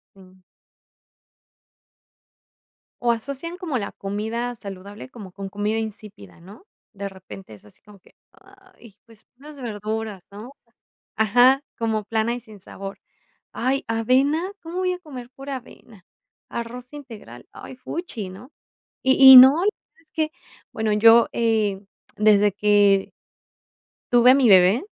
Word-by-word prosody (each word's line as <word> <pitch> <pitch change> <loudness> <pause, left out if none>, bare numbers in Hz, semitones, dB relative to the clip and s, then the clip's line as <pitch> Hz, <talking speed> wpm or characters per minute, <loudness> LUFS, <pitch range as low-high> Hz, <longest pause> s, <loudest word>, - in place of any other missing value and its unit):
Jum. 185 -1 -20 2.6
O 240 -1 +2
asocian 280 +9 -5
como 335 -8 -3
la 205 -3 -5
comida 220 +5 -5
saludable 200 +1 -10
como 210 -7 -12
con 195 +1 -8
comida 205 +2 -2
insípida, 210 - -9
¿no? 200 - -16 0.3
De 200 -1 -6
repente 190 - -13
es 105 - -17
así 105 - -21
como 210 -1 -18
que: - - -25 0.2
"Ay, 380 - -20
pues, 225 -2 -19
unas 290 +1 -13
verduras, 215 -2 -5
¿no?". 215 +6 -11 0.7
Ajá, 245 +5 +4 0.2
como 220 -2 -2
plana 225 +2 -1
y 245 - -7
sin 215 -3 -16
sabor, 195 +1 -9 0.5
"Ay, 260 +3 -2
avena, 270 - 0
¿cómo 335 +2 -7
voy 370 0 0
a 360 - -5
comer 260 -8 -11
pura 275 +1 -7
avena?, 230 -5 -15 0.4
arroz 245 +2 -7
integral, 265 -8 -12
ay, 260 - -11
fuchi, 255 - -6
¿no?", 235 +10 -13 0.5
y 265 0 +8
y - - +12
no 265 +4 +9 0.4
es 325 - -33
que 315 -1 -2 0.4
bueno, 220 -1 -2
yo, 225 +2 +6
eh, 220 -4 0 0.4
desde 210 -1 +4
que 205 -1 +2 1.0
tuve 240 +1 +6
a 255 - +7
mi 270 -3 +3
bebé, 190 +3 +5
225 Hz, 135 wpm, -22 LUFS, 205-260 Hz, 2.6 s, y